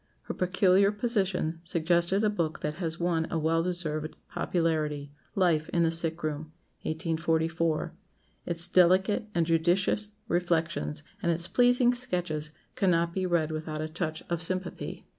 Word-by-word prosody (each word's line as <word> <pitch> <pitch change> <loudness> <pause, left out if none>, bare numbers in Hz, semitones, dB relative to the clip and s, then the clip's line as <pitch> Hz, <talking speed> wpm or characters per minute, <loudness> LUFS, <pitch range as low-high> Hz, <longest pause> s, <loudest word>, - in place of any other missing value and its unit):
Her - - -5
peculiar 185 +2 +3
position 195 -7 -1
suggested 170 +4 +1
a 215 - +4
book 165 -6 -2
that 150 - -2
has 165 -1 -2
won 170 -2 0
a 165 - -1
well 160 +1 +2
deserved 165 -3 -2 0.2
popularity 155 -4 -1 0.2
"Life 170 -5 +2
in 170 - +2
the 165 - +2
Sick 165 0 0
room" 155 0 -3 0.3
(1844). 165 0 0 0.5
Its 170 0 +1
delicate 185 +5 +4
and 170 -1 +3
judicious 175 +5 +1 0.2
reflections, 170 -4 -1 0.2
and 170 - +2
its 170 +1 -2
pleasing 245 +2 +4
sketches, 175 -10 0 0.2
cannot 170 -3 +2
be 185 0 -1
read 165 -3 +1
without 155 0 -4
a 155 - -2
touch 160 0 -4
of 170 -1 -2
sympathy. 185 +1 -4
170 Hz, 140 wpm, -28 LUFS, 160-180 Hz, 0.5 s, a